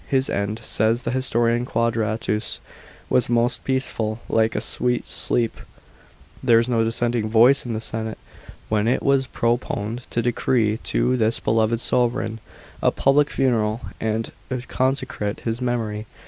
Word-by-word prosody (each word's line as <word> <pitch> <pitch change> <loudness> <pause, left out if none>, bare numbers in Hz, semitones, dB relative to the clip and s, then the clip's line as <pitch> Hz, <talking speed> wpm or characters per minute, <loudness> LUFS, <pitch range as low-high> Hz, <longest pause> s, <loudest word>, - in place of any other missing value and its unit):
His 135 0 +1
end, 100 +2 -2
says 115 +3 +1
the 120 - -2
historian 120 -2 +1
Qnadratus, 110 -3 -1 0.5
was 125 -2 +2
most 120 +1 +1
peaceful, 120 -4 -1
like 110 0 +2
a - - +1
sweet 125 0 -1
sleep. 115 -2 -1
§ - - -25
13. - - -13 0.8
There 120 -3 +5
was 115 +1 +2
no 115 -2 +2
dissenting 115 0 0
voice 120 +4 +5
in 120 - -2
the 110 - -2
senate, 110 -1 -2 0.5
when 105 0 +1
it 125 - +1
was 135 -1 +2
proponed 120 -1 -2
to 120 - -1
decree 115 -2 +1
to 125 +1 +1
this 115 0 +1
beloved 110 +1 +1
sovran 120 -2 0 0.4
a - - +4
pu' 135 - +2
lic 145 +1 +3
funeral, 115 -4 +1 0.2
and 110 0 -2 0.2
u> 130 -2 -3
consecrate 130 -6 -1
his 115 +1 -3
memory. 110 -4 -2
115 Hz, 155 wpm, -23 LUFS, 110-125 Hz, 0.8 s, There